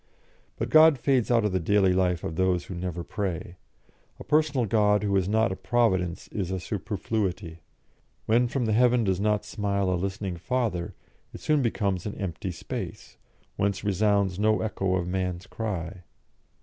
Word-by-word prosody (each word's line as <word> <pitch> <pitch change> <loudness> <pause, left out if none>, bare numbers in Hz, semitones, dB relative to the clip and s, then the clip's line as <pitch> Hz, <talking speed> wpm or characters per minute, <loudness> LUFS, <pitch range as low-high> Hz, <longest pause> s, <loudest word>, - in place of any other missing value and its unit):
But - - -3
God 155 -2 +7
fades 130 -2 +1
out 115 -3 +3
of 105 - +1
the 95 - +1
daily 95 +1 +3
life 90 -2 +1
of 80 - -4
those 90 -1 +1
who - - -7
never 90 -1 -4
pray; 90 -3 -4 0.6
a - - -7
personal 150 -5 +2
God 105 -1 +2
who 100 -1 +1
is 95 -1 +1
not 110 0 +2
a - - -2
Providence 95 -7 0
is 95 -4 -3
a 95 0 -2
superfluity; 95 -3 -3 0.7
when 120 +3 +3
from 125 0 -1
the 110 - +1
heaven 120 +1 +4
does 95 -3 0
not 105 0 +1
smile 100 -3 -1
a - - +2
listening 95 0 -3
Father, 110 -4 -2 0.4
it - - -7
soon 150 -2 +2
becomes 100 -6 -1
an 105 - -5
empty 95 -1 -4
space, 85 - -7 0.4
whence 100 -1 0
resounds 100 -2 +1
no 110 0 +2
echo 95 -3 -1
of 90 -2 -1
man's 90 -1 -2
cry. 95 -5 -5
100 Hz, 170 wpm, -26 LUFS, 90-110 Hz, 0.7 s, God